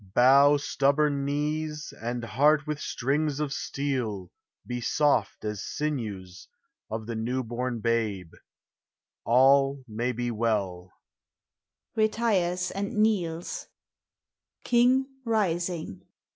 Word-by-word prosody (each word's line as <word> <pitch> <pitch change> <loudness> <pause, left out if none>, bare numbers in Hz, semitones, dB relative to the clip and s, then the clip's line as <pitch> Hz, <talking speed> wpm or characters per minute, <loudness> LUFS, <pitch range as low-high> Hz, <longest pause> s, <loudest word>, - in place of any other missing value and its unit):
Bow, 140 +3 +6
stubborn 140 0 +1
knees; 150 +1 -2
and 120 +1 -3
heart 145 +5 +3
with 150 -1 -4
strings 145 +3 -1
of 150 -2 -2
steel, 125 -13 -3 0.4
He 125 0 -3
soft 130 -6 +1
as 105 -2 -3
sinews 105 -12 -4 0.4
of 110 0 -4
the 115 - -4
new 125 +4 -2
born 120 0 -3
babe! 110 -7 -1 0.9
All 135 +2 +4
ma 110 +2 -4
v 125 - +2
be 120 +1 -2
well. 100 -6 -1
125 Hz, 85 wpm, -27 LUFS, 110-145 Hz, 0.9 s, Bow